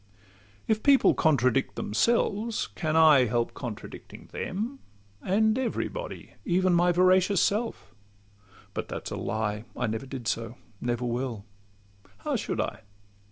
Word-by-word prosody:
If 220 0 +1
people 280 -2 +5
contradict 135 -4 +2
themselves, 220 - 0
can 155 -3 -1
I 155 -5 +7
Help 120 +1 0
contradicting 120 -5 -8
them, 230 +9 -4 0.4
and 220 +5 +2
every 255 -3 -1
body, - - -7
Even 185 +1 +2
my 175 +1 +4
veracious 185 +2 +4
self?—But 100 - -4
that - - -5
's - - -15
a - - -2
lie: 110 -1 -2
I 125 - 0
never 110 +3 -3
did 130 -4 -6
so, 115 +1 -2 0.2
never 120 0 -1
will—how 100 -4 -6
should - - -2
I? 100 - -2
130 Hz, 125 wpm, -27 LUFS, -, 0.4 s, I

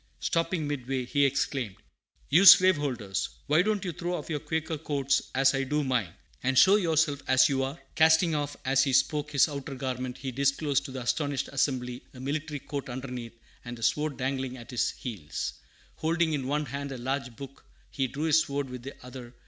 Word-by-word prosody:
Stopping 165 -2 -1
midway, 130 -2 -3
he 140 +3 +2
exclaimed, 130 -5 -1 0.6
"You 175 +7 +6
slaveholders! 140 - +5 0.2
Why 155 +4 +4
don't 210 0 0
you 180 - -2
throw 175 +2 -3
off 175 - -6
your 150 - -1
Quaker 160 +1 -3
coats 140 -3 0
as 135 +1 +4
I 135 - 0
do 150 +3 0
mine, 125 - 0 0.3
and 130 +1 0
show 190 +8 +7
yourselves 160 -6 +1
as 130 0 +5
you 135 -1 0
are?" 135 +5 -3
Casting 160 +1 +4
off 145 -1 -2
as 135 0 +3
he 135 -2 0
spoke 150 +3 +2
his 140 0 +4
outer 140 -2 -6
garment, 130 -1 -4
he 135 -1 -5
disclosed 140 +2 +1
to - - -7
the 130 -1 -5
astonished 145 +2 -1
assembly 125 -3 -1
a - - -10
military 145 +2 -3
coat 140 -1 -5
underneath 125 -2 -6 0.3
and 120 0 -7
a 115 - -9
sword 140 +5 0
dangling 130 0 -2
at 120 +1 -11
his 125 - +1
heels. 100 - -5 0.4
Holding 165 0 +1
in 135 -3 -2
one 150 +2 0
hand 140 +2 -5
a 135 - -5
large 130 0 -3
book, 135 +1 -11 0.3
he 135 -2 -1
drew 135 +5 -5
his 160 0 +4
sword 140 -4 -3
with 125 -1 -7
the 135 +3 -8
other. 125 -1 -10
140 Hz, 195 wpm, -28 LUFS, 130-150 Hz, 0.6 s, show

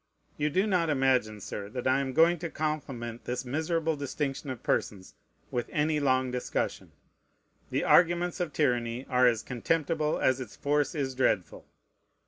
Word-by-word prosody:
You 150 0 0
do 190 +7 +2
not 180 -6 +1
imagine, 130 -7 +1
Sir, 100 +2 -6
that 125 +2 -5
I 130 +1 +3
am 135 -1 -2
going 165 +3 +4
to 170 0 -4
compliment 135 -7 -4
this 125 +1 -3
miserable 160 +4 0
distinction 140 0 -3
of 130 -3 -6
persons 95 -3 -1 0.4
with 120 -1 -2
any 150 0 +1
long 130 -2 +2
discussion. 125 0 -3 0.8
The - - 0
arguments 175 +1 +3
of 175 -3 -2
tyranny 125 -4 0
are 125 0 +5
as 115 -3 +1
contemptible 155 +4 0
as 130 0 +2
its 115 -5 -8
force 145 +2 0
is 135 -3 -1
dreadful. 105 -9 0
135 Hz, 155 wpm, -29 LUFS, 125-155 Hz, 0.8 s, are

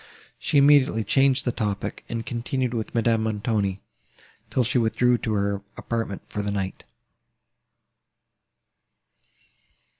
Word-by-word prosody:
She 160 -3 +1
immediately 140 -5 +5
changed 135 +4 +3
the 125 - +1
topic, 105 -3 -3
and 115 -1 -3
continued 125 +1 -2
with 115 +1 -4
Madame 115 -1 +2
Montoni, 105 -3 -1 0.7
till 130 - +1
she 125 +2 +2
withdrew 120 +1 +2
to 110 - -2
her 100 -1 0 0.2
apartment 115 -4 -3
for 105 - -4
the 105 - -2
night. 95 -2 -3
115 Hz, 115 wpm, -25 LUFS, 105-125 Hz, 0.7 s, immediately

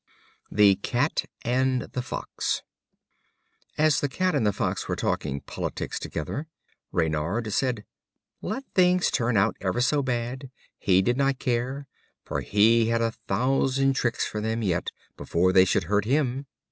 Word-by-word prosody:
The 100 -2 +5
Cat 130 +8 0 0.2
and 130 +1 +1
the 125 - -4
Fox. - - -3 1.1
As 155 0 +3
the 145 - 0
Cat 185 +6 0
and 130 -8 +2
the - - +3
Fox - - -2
were - - -1
talking 70 +1 -2
politics - - -4
together, 140 - -4 0.4
Reynard 85 +7 -1
said: 125 -4 0 0.6
"Let 270 - -3
things 180 -1 +4
turn 115 -1 +1
out 95 - +2
ever 95 +4 -1
so 140 +4 +2
bad, 125 +1 -3 0.3
he 95 0 +3
did 120 +5 +1
not 135 -1 +2
care, 130 +3 -2 0.4
for - - -3
he 110 +2 +4
had 115 0 +1
a 115 - +1 0.2
thousand 135 +5 +2
tricks 120 -3 0
for 105 - -4
them 110 +1 -1
yet, 90 -4 0 0.3
before 90 +2 +1
they 95 0 +7
should 95 - +1
hurt 105 +4 +1
him." 135 +1 0
120 Hz, 150 wpm, -26 LUFS, 105-135 Hz, 1.1 s, they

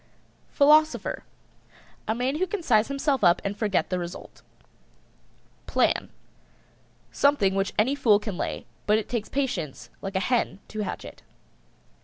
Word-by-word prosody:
PHILOSOPHER. 305 +2 +3 0.8
A 220 - 0
man 255 +4 -1
who 375 +3 0
can 380 0 -4
size 220 -6 +3
himself 275 -2 0
up 175 0 +5
and 200 +1 -2
forget 205 -3 0
the 185 - 0
result. 175 0 -8 1.3
PLAN. - - +1 1.0
Something 280 -10 +3
which 195 0 -1
any 235 +6 +3
fool 225 -7 +4
can 210 -2 -5
lay, - - -4 0.2
but 210 +1 +4
it 220 - -3
takes 235 -4 -3
patience 165 - -3
like 195 0 -6
a - - +3
hen 235 +1 0
to 215 - -6
hatch 210 - -4
it. - - -11
215 Hz, 145 wpm, -26 LUFS, 195-275 Hz, 1.3 s, up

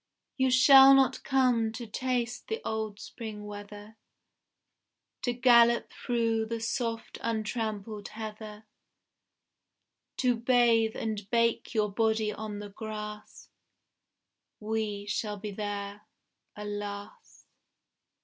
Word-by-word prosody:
You 260 -1 +2
shall 270 +1 +8
not 270 -1 +2
come 250 -4 +2
to 235 +1 -6
taste 245 +1 -2
the 445 +1 -3
old 220 -2 -3
Spring 215 -2 -8
weather, 205 +1 -10 1.2
To 245 - 0
gallop 235 -1 +4
through 230 -2 0
the 230 0 -3
soft 230 0 -3
untrampled 215 -2 -3
heather, 215 0 -8 1.5
To 250 -2 +2
bathe 230 -2 +3
and 210 -3 -4
bake 230 0 +1
your 210 -2 +1
body 220 0 +1
on 215 -1 -6
the 205 0 -7
grass. 210 0 -8 1.1
We 215 -2 -3
shall 210 0 -3
be 205 +1 -6
there, 205 0 -5 0.5
alas! 205 - -7
220 Hz, 100 wpm, -29 LUFS, 210-235 Hz, 1.5 s, shall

